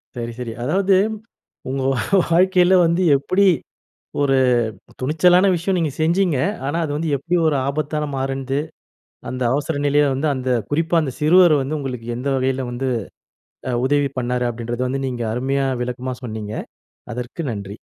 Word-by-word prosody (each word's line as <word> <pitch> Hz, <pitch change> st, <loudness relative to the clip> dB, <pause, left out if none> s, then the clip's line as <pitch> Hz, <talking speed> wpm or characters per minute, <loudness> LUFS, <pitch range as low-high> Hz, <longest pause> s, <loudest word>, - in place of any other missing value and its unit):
சரி, 120 Hz, -1 st, -4 dB
சரி. 120 Hz, -2 st, -4 dB
அதாவது 190 Hz, +8 st, +2 dB, 0.7 s
உங்க 135 Hz, +1 st, -2 dB, 0.5 s
வாழ்க்கையில 180 Hz, +1 st, +4 dB
வந்து 170 Hz, +2 st, +1 dB, 0.2 s
எப்படி 185 Hz, +8 st, +1 dB, 0.8 s
ஒரு 135 Hz, -1 st, +3 dB, 0.6 s
துணிச்சலான 175 Hz, +7 st, +4 dB
விஷயம் 185 Hz, +3 st, -1 dB
நீங்க 160 Hz, -4 st, 0 dB
செஞ்சீங்க. 170 Hz, -1 st, +2 dB, 0.3 s
ஆனா, 145 Hz, +4 st, -1 dB
அது 150 Hz, -, -3 dB
வந்து 160 Hz, 0 st, -2 dB
எப்படி 165 Hz, +6 st, -1 dB
ஒரு 155 Hz, -2 st, +2 dB
ஆபத்தாக 150 Hz, +1 st, -2 dB
மாறுனுது, 135 Hz, +1 st, -2 dB, 0.7 s
அந்த 130 Hz, 0 st, -4 dB
அவசர 145 Hz, +3 st, -1 dB
நிலைய 145 Hz, +1 st, +4 dB
வந்து 145 Hz, +4 st, 0 dB
அந்த 130 Hz, -1 st, -4 dB, 0.2 s
குறிப்பா 165 Hz, +3 st, +1 dB
அந்த 135 Hz, -4 st, -3 dB
சிறுவர் 170 Hz, +2 st, +6 dB
வந்து 145 Hz, +4 st, -3 dB
உங்களுக்கு 125 Hz, -5 st, -5 dB
எந்த 125 Hz, +3 st, -3 dB
வகையில 130 Hz, 0 st, -1 dB
வந்து 125 Hz, +2 st, -3 dB, 0.8 s
அ -, -, 0 dB
உதவி 145 Hz, 0 st, +2 dB
பண்ணாரு, 125 Hz, 0 st, -1 dB
அப்படீன்றது 120 Hz, +2 st, -3 dB
வந்து 135 Hz, +1 st, -2 dB
நீங்க 120 Hz, -2 st, -3 dB
அருமையா 135 Hz, +3 st, 0 dB, 0.2 s
விளக்கமா 125 Hz, +1 st, -4 dB
சொன்னீங்க. 110 Hz, -2 st, -5 dB, 0.6 s
அதற்கு 125 Hz, +7 st, -5 dB
நன்றி. 100 Hz, -1 st, -6 dB
140 Hz, 145 wpm, -20 LUFS, 125-160 Hz, 0.8 s, சிறுவர்